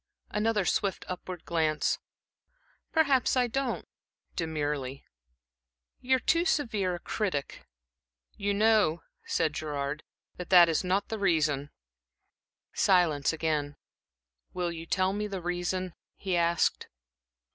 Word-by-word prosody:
Another 210 -2 +1
swift 195 0 0
upward 180 -1 -6
glance. 155 -2 +1 0.9
"Perhaps 280 -5 +3
I 250 - +4
don't" 250 +1 -2 0.5
demurely. 145 -5 -3 0.9
"You're 260 +1 +2
too 335 +7 +2
severe 215 - 0
a - - -7
critic." 180 -8 -3 0.7
"You 200 0 -1
know," 210 -6 +3 0.2
said 155 -2 +1
Gerard, 145 -1 -3 0.4
"that 180 - -7
that 175 -2 +8
is 160 - +1
not 185 +2 0
the 220 - -3
reason." 155 -7 +1 1.0
Silence 170 -7 +3
again. 155 -3 -1 0.8
"Will 175 -1 -1
you 165 0 -7
tell 185 +1 +1
me 210 +1 -2
the 195 -2 -4
reason?" 180 +1 -2 0.2
he 190 -2 -2
asked. 170 -1 +1
180 Hz, 115 wpm, -29 LUFS, 155-205 Hz, 1.0 s, that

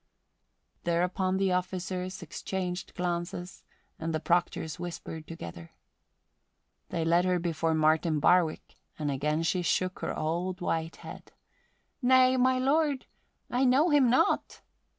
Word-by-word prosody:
Thereupon 180 +2 0
the 195 -1 +1
officers 185 0 -3
exchanged 180 +2 -4
glances 175 +1 -4 0.4
and 160 0 -2
the - - 0
proctors 165 -2 0
whispered 165 -2 -6
together. 85 - -9 1.2
They 165 -1 -1
led 170 +2 +4
her 180 -1 +2
before 165 -2 0
Martin 155 0 +2
Barwick 170 +1 +2 0.2
and 150 -2 -1
again 150 +4 0
she 180 +2 +1
shook 185 +3 0
her - - -3
old 175 +4 -2
white 165 -2 -2
head. - - -11 0.7
"Nay, 255 0 +5
my 255 0 +3
lord, 280 +1 +1 0.5
I 250 +2 +2
know 270 +6 +4
him 280 -4 +5
not." 250 - +1
180 Hz, 125 wpm, -29 LUFS, 160-190 Hz, 1.2 s, Nay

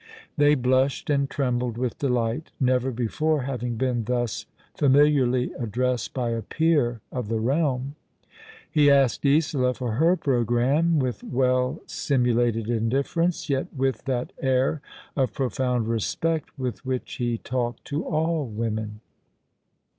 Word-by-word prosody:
'' - - -22
They 145 0 +5
blushed 130 +2 +1
and 140 -1 +1
trembled 125 -4 -1
with 125 -1 -2
delight, 125 +2 -1
never 130 0 +2
before 135 +5 0
having 125 -3 -3
been 120 -1 -1
thus 120 -2 -2 0.3
familiarly 135 -3 +3
addressed 120 0 -1
by 120 -3 -1
a 115 0 -2
peer 145 -7 +1
of 125 -4 -4
the 115 +1 -1
realm. 135 +1 0 0.7
He 150 -2 +4
asked 135 -4 +3
Isola 140 -4 +2
for 125 -3 -3
her 165 +5 +4
programme, 135 - +2
with 130 -4 -1
well 125 +2 +1
simu 125 -4 0
lated 115 -2 +1
indifference, 135 +9 0
yet 135 -3 0
with 135 -1 -1
that 125 -3 -2
air 130 +2 +1 0.3
of 130 -7 0
profound 125 -2 -1
respect 150 +9 -1
with 130 -1 -4
which 130 -1 -4
he 120 -1 -1
talked 120 0 -3
to 145 +3 -2
all 160 -2 0
women. 110 -1 -4
130 Hz, 135 wpm, -25 LUFS, 120-140 Hz, 0.7 s, They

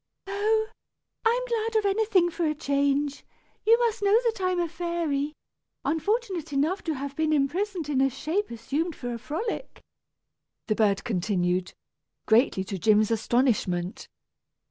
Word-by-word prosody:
"Oh! 430 +2 +1 0.5
I 465 +2 +3
am - - -4
glad 455 -1 -1
of 430 - +1
anything 395 -3 +3
for 335 -1 -1
a 305 - 0
change! 285 -1 0 0.4
You 455 +1 +7
must 470 -2 0
know 405 +2 +5
that 460 -4 -1
I 370 - +2
am 365 -1 0
a 345 - +1
fairy, 320 -3 -2 0.5
unfortunate 355 - -1
enough 300 +8 0
to 320 -3 -1
have 280 +1 -5
been 315 +1 +1
imprisoned 330 +4 0
in 275 -3 +1
a 270 - +4
shape 315 +10 -2
assumed 280 +8 -2
for 245 -1 -5
a 235 - -5
frolic," 430 - -4 0.9
the 215 - +1
bird 210 -2 +2
continued, 180 -3 0 0.5
greatly 220 -4 +3
to 190 0 -5
Jim's 215 +2 +4
astonishment. 220 -6 0
310 Hz, 150 wpm, -27 LUFS, 245-400 Hz, 0.9 s, You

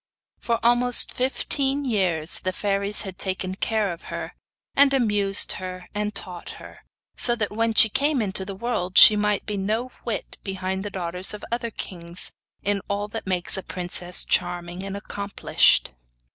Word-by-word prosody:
For 230 -1 -1
almost 240 +1 +4
fifteen 270 +2 0
years 185 -9 +2
the 185 - -2
fairies 200 +1 -1
had 190 -3 -8
taken 185 -1 -1
care 210 -1 -1
of 165 - -13
her, - - -5 0.4
and 275 0 +5
amused 205 -6 +2
her 185 -1 -7
and 210 0 -3
taught 180 -3 -5
her, - - -13 0.4
so 240 - +2
that 215 -3 -2
when 225 +1 0
she 220 +1 +7
came 275 +5 +1
into 195 -3 -2
the 195 0 -7
world 200 -4 -2
she 215 - +11
might 210 0 0
be 210 -1 -3
no 220 +6 -2
whit 225 -4 -4
behind 190 -1 -3
the 205 - -4
daughters 180 +1 -2
of 210 - -9
other 235 0 -2
kings 175 -5 -6 0.3
in 200 0 0
all 200 +1 -2
that 200 - -7
makes 185 0 +1
a - - -3
princess 180 +1 -4
charming 175 0 0
and 195 0 -5
accomplished. 200 - +2
200 Hz, 165 wpm, -24 LUFS, 185-225 Hz, 0.4 s, she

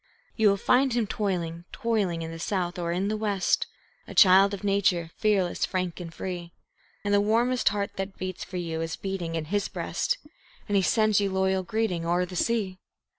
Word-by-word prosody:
You 220 -2 +4
will 200 - +2
find 255 +5 +3
him 235 -2 +1
toiling, 175 -5 -2
toiling, 205 -9 -1
in 160 - -5
the 165 - -8
south 180 -1 -2
or 170 -1 -1
in 185 +3 0
the 215 - 0
west, 205 -3 +1 0.4
A - - -9
child 195 0 +7
of 200 0 -6
nature, 195 -4 +1
fearless, 200 -5 +1
frank, 185 -2 -2
and 170 -2 -7
free; 175 -1 -6 0.5
And 205 0 0
the 200 - +5
warmest 235 +4 +2
heart 200 0 -3
that 195 0 -4
beats 185 -1 -4
for 185 - -6
you 165 -2 -3
is 165 0 -3
beating 185 -4 -4
in 160 -1 -2
his 205 -1 +1
breast, - - -2 0.5
And 205 - 0
he 195 - +5
sends 215 +4 +3
you 200 - +1
loyal 190 0 +1
greeting 185 -2 -1
o'er 175 +2 +1
the 180 0 -9
sea. 195 -2 0
190 Hz, 195 wpm, -27 LUFS, 175-205 Hz, 0.5 s, child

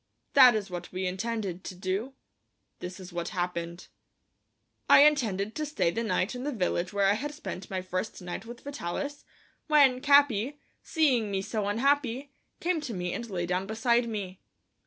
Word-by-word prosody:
That 255 -4 +8
is 205 -3 -3
what 175 -1 -6
we 185 +1 -3
intended 190 -1 -3
to 185 - -6
do; 190 +8 -3 0.7
this 180 +2 -7
is 185 -1 -10
what 170 -1 -3
happened: 175 0 -3 1.0
I - - +9
intended 220 -9 +1
to 305 - -3
stay 280 - +1
the 225 - -2
night 200 -1 0
in 250 - -6
the 295 - -2
village 185 -5 -1
where 200 -1 +1
I 195 - +5
had 280 +8 -3
spent 195 - -7
my 185 -1 -3
first 185 +3 -4
night 180 +4 -6
with 240 +1 -9
Vitalis, 285 +2 -5 0.4
when 280 -5 +5
Capi, 280 -2 +4 0.2
seeing 260 -10 +2
me 195 -1 -1
so 210 0 -2
unhappy, 270 +4 +1 0.3
came 350 -2 0
to 250 -8 -5
me 180 -1 -3
and 235 -1 -5
lay 175 -3 -2
down 180 +2 -1
beside 235 +2 +1
me. 195 -4 -5
215 Hz, 175 wpm, -28 LUFS, 185-265 Hz, 1.0 s, I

